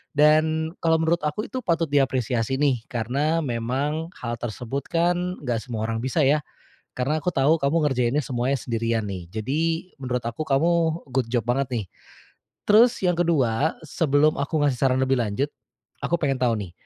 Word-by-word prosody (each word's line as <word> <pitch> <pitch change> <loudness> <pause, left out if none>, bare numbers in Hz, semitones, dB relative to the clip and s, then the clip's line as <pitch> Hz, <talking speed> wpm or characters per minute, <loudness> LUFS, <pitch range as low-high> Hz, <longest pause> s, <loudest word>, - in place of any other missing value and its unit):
Dan, 155 +2 +3
kalo 165 -1 +3
menurut 160 +1 +1
aku 150 - -2
itu 260 - -2
patut 165 - 0
diapresiasi 130 -3 +1
nih, 135 -3 +2
karena, 140 +8 0
memang, 135 +6 -2
hal 120 -1 -5
tersebut 125 +3 -4
kan, 175 +2 0
nggak 120 -3 -1
semua 115 -2 -5
orang 115 0 -2
bisa 130 +5 0
ya. 145 +3 +4 0.5
Karena 135 +5 -1
aku 180 - +2
tahu 145 +4 +3
kamu 140 +4 +2
ngerjainnya 125 +2 +1
semuanya 130 +1 -1
sendirian 115 -2 -1
nih. 90 -3 -7
Jadi, 160 - -1
menurut 125 -2 -2
aku 120 +7 -4
kamu 165 +3 +1
good 130 -1 0
job 120 - +3
banget 135 +1 +1
nih. 115 -4 -1 0.8
Terus 225 +3 +5
yang 180 -1 +3
ke-2, 155 -5 +1
sebelum 150 0 +2
aku 145 +2 -1
ngasih 145 -3 +2
saran 130 -1 +2
lebih 130 0 +2
lanjut. 115 +6 -1 0.5
Aku 170 - +1
pengen 135 -5 -1
tahu 120 -3 +2
nih, 95 -4 -6
140 Hz, 165 wpm, -24 LUFS, 120-160 Hz, 0.8 s, Terus